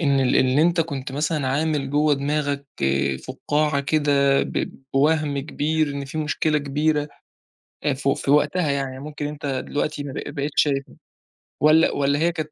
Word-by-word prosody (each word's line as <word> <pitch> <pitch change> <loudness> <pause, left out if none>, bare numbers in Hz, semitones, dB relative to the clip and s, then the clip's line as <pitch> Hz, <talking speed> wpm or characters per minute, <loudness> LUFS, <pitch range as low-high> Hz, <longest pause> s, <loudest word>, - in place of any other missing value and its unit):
إن 140 -4 +2
ال 130 - +2
إن 130 +1 +3
أنت 170 +2 +3
كنت 140 -4 -4
مثلًا 150 -1 -1
عامل 145 -1 0
جوّه 150 0 +3
دماغك 140 0 -2 0.6
فُقَّاعة 145 +2 0
كده، 140 -2 +2
ب - - -2 0.2
بوَهم 145 0 +2
كبير 155 +1 -1
إن 140 0 -4
في 145 +4 -6
مشكلة 155 0 0
كبيرة 150 +1 0 0.8
آآ، 145 -2 +2
ف 135 +1 -3
في 135 0 0
وقتها 150 +2 +2
يعني، 135 -2 -2
ممكن 150 0 -5
أنت 145 -1 -6
دلوقتي 145 +2 -2
ما 140 - -6
بق - - -4
ما 145 - -6
بقيتش 145 0 +1
شايفها 140 -2 -2 0.7
والَّا 155 +2 +5
والَّا 140 +1 +1
هي 170 +1 +2
كانت 155 -2 -5
145 Hz, 170 wpm, -23 LUFS, 140-155 Hz, 0.8 s, والَّا